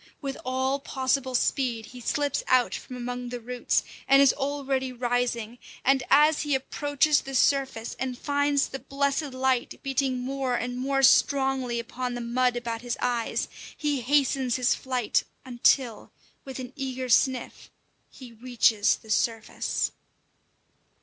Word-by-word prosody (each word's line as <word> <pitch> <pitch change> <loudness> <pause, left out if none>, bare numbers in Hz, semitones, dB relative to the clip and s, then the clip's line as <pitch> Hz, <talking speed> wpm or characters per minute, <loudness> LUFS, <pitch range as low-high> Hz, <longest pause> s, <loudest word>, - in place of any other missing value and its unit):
With 275 -2 -4
all 260 +2 0
possible 260 -1 -1
speed 240 -3 0
he 250 - -11
slips 285 +4 0
out 255 -1 +3
from 255 - -7
among 245 0 -5
the 245 0 -5
roots, 245 +1 -1 0.2
and 275 0 +6
is 275 -1 +6
already 275 -2 -2
rising; 245 -1 -2 0.3
and 270 0 +4
as 300 +2 +5
he 295 -2 0
approaches 290 +2 +1
the 270 0 -7
surface 265 -4 +1
and 255 -1 -3
finds 285 0 +1
the 270 - -6
blessed 280 +1 -1
light 260 -1 0
beating 270 -1 0
more 260 0 -2
and 245 +1 -3
more 270 +2 0
strongly 265 -3 +3
upon 245 +1 -4
the - - -4
mud 245 +1 +1
about 230 -1 -4
his 245 -1 -3
eyes, 240 -2 -1 0.3
he 295 -3 -1
hastens 270 -1 +2
his 250 -1 +2
flight, 255 -4 0 0.2
until, 245 -2 +1 0.3
with 265 -2 -7
an 255 0 -7
eager 260 -2 -4
sniff, 255 +1 +1 0.4
he 255 -3 -12
reaches 230 -3 +2
the 220 - -11
surface. 225 0 -1
255 Hz, 145 wpm, -26 LUFS, 245-275 Hz, 0.4 s, and